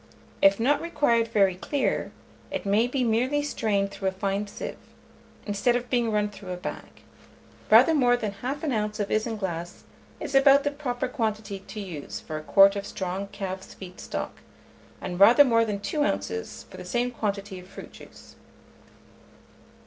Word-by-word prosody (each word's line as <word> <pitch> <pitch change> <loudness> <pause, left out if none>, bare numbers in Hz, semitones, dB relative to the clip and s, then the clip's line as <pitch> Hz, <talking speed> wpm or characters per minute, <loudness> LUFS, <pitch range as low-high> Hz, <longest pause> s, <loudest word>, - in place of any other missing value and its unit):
If 195 +1 +5
not 280 +6 +2
required 235 -9 +2
very 200 -4 +3
clear, 265 +9 -1 0.4
it - - -4
may 210 +4 +3
be 255 +1 -1
merely 250 +6 +1
strained 205 -8 0
through 195 - -4
a - - +2
fine 195 +2 -2
sieve, 205 - -7 0.7
instead 205 +4 +1
of 245 0 -3
being 240 -2 +2
run 210 -1 +1
through 200 -2 -11
a 180 - -3
bag. 180 - -8 0.7
Rather 325 - +7
more 245 -5 +4
than 215 -4 -3
1/2 250 +2 -2
oz. 210 +1 -11
of 205 - -2
isinglass 195 -6 -3 0.4
is - - -6
about 275 +1 +6
the 290 - 0
proper 260 -3 -3
quantity 215 -6 -3
to 205 +2 -9
use 175 -8 -6
for 155 - -6
a - - -5
quart 195 +4 +6
of 200 0 -4
strong 190 +1 -4
calf's 190 -1 -6
feet 185 -1 -11
stock, - - -5 0.6
and 180 0 -5
rather 235 +8 +8
more 230 -4 +3
than 210 -3 -2
2 295 +8 -1
oz. 95 -2 -3
for - - -12
the - - -7
same 240 +7 -1
quantity 200 -4 -3
of 180 - -13
fruit - - -11
juice. - - -15
210 Hz, 170 wpm, -26 LUFS, 195-245 Hz, 0.7 s, rather